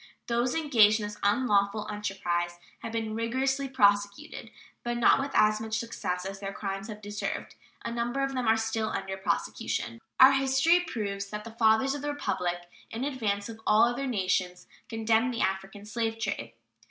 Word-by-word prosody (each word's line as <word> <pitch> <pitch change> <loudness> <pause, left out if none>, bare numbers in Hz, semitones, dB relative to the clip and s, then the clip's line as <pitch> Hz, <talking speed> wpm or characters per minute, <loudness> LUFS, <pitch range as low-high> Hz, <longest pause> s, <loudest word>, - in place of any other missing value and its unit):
Those 240 +1 0
engaged 230 -9 +5
in 210 - -3
this 210 0 -7
unlawful 205 -1 +2
enterprise 175 -4 -2 0.2
have 225 - -6
been 225 -1 -2
rigorously 265 +4 -1
prosecuted, 205 +2 +1 0.3
but 240 0 -2
not 240 - +5
with 275 +1 -2
as 215 0 +4
much 220 0 -2
success 180 -6 -3
as 195 0 -5
their 195 0 -4
crimes 195 +1 -4
have 210 -1 -9
deserved. 205 0 -4 0.3
A - - -2
number 240 +3 -1
of 270 0 -1
them 255 -3 -1
are 220 0 +5
still 225 0 -1
under 190 0 -3
prosecution. 115 -10 -2 0.2
Our 260 +1 +10
history 270 +5 +4
proves 205 - -4
that 210 0 -5
the 230 - -9
fathers 225 +4 +3
of 285 - -5
the 290 0 -2
Republic, 180 -11 -2 0.3
in 230 +3 -4
advance 215 -8 -1
of 225 -1 -9
all 215 +2 +6
other 240 +3 +1
nations, 185 -5 -1 0.2
condemned 225 +2 +1
the - - -2
African 195 +1 -2
slave 225 +1 -2
trade. 195 - -4
220 Hz, 175 wpm, -28 LUFS, 200-240 Hz, 0.3 s, Our